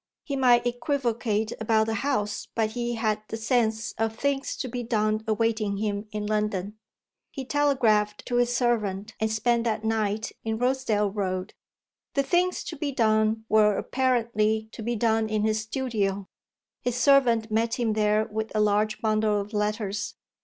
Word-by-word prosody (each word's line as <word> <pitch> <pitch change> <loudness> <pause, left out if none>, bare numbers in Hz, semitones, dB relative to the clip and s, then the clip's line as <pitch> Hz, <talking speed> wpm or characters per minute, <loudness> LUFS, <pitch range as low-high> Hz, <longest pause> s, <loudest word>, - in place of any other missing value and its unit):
He 280 - -3
might 245 -3 +4
equivocate 240 -4 -1
about 220 0 +3
the 225 - -2
House, 210 -4 -1
but 220 -1 +1
he 240 +1 -2
had 215 -2 0
the 225 - -4
sense 225 -1 0
of 225 0 0
things 275 +2 -1
to 260 - -3
be 245 0 -4
done 215 -2 0
awaiting 215 -2 0
him 205 0 -2
in 210 0 -3
London. 210 -1 -1 0.5
He 270 -2 -6
telegraphed 235 -8 +2
to 245 - -1
his 245 0 +2
servant 220 -4 0
and 220 0 0
spent 235 +1 +1
that 220 -1 -1
night 220 -1 -1
in 220 -1 -2
Rosedale 235 -5 +1
Road. 185 -2 -3 0.6
The 275 - +3
things 360 +4 +1
to 320 - -6
be 285 -1 -3
done 220 -2 +2
were 210 -1 +4
apparently 225 -4 0
to 230 - -9
be 235 +2 -1
done 225 0 +1
in 215 -1 0
his 215 0 +1
studio: 215 -5 -2 0.5
his 245 -1 -1
servant 240 -4 +4
met 225 +1 +1
him 235 -3 0
there 210 0 +2
with 220 0 -4
a - - +2
large 210 +1 +1
bundle 215 -1 +2
of 205 +2 -6
letters. 210 -1 -2
220 Hz, 165 wpm, -26 LUFS, 210-240 Hz, 0.6 s, might